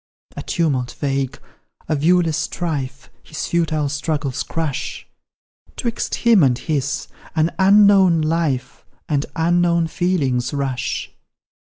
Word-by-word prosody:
A - - -5
tumult 140 -8 -1
vague 135 -2 -1 0.5
a 155 - +1
viewless 165 +2 +2
strife 140 -6 -4
His 155 - -6
futile 160 -3 0
struggles 145 -2 -2
crush; 160 -5 -3 0.7
'Twixt 235 -2 -2
him 230 -5 +4
and 130 -4 +3
his 140 +1 -2 0.3
an 160 +1 +2
unknown 195 -3 +6
life 155 -5 -1 0.2
And 145 -2 0
unknown 170 0 +2
feelings 145 -7 0
rush. 135 -3 -2
155 Hz, 110 wpm, -20 LUFS, 140-170 Hz, 0.7 s, unknown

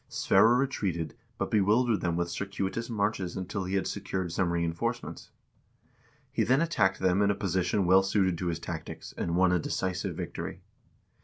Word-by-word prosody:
Sverre 115 +2 +4
retreated, 95 - -1 0.2
but - - -2
bewildered 110 +2 +3
them 85 -1 0
with 85 0 -1
circuitous 100 +4 -3
marches 100 -5 -1
until 95 +1 -3
he 95 +2 -2
had 95 - +1
secured 95 -3 -3
some 85 0 0
reinforcements. 85 -1 -2 1.0
He - - +1
then 130 +3 +3
attacked 165 -12 +2
them 95 +1 +2
in 100 - +3
a 100 - +2
position 95 0 0
well 95 +2 +6
suited 95 -2 +1
to 90 - -2
his 85 -1 -1
tactics, 85 -1 -7
and 85 - -2
won 90 0 +4
a 90 - +3
decisive 90 +2 -2
victory. - - -5
95 Hz, 165 wpm, -29 LUFS, 85-100 Hz, 1.0 s, well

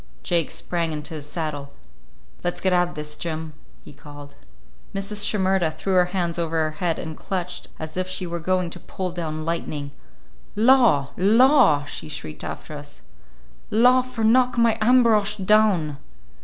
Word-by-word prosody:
Jake 170 -3 +1
sprang 170 -2 -2
into 150 +2 -6
his 150 -2 -7
saddle. 150 -3 -4 0.7
"Let's 175 - -2
get 190 -1 +1
out 175 0 +3
of - - -12
this, 150 0 -4
Jim," 160 -1 -5 0.3
he - - -13
called. 145 -1 -12 0.6
Mrs. 200 +1 -2
Shimerda 190 -5 +1
threw 190 +5 -3
her 180 -1 +5
hands 175 -2 -2
over 165 -1 -2
her 155 - -1
head 170 -2 -1
and 160 -1 -6
clutched 180 0 -4
as 155 0 -7
if 185 0 -1
she 185 0 -3
were 170 0 -4
going 185 0 0
to 175 - -7
pull 185 +1 -5
down 155 -3 -4
lightning. 150 -4 -3 0.6
"Law, 225 - +4
law!" 220 - +5
she 145 +1 -7
shrieked 80 - -6
after 155 - -7
us. 145 0 -12 0.7
"Law 250 +4 +5
for 250 -3 -5
knock 245 +2 +3
my 230 -1 +4
Ambrosch 220 -3 +4
down!" 190 -7 +2
175 Hz, 160 wpm, -23 LUFS, 155-210 Hz, 0.7 s, her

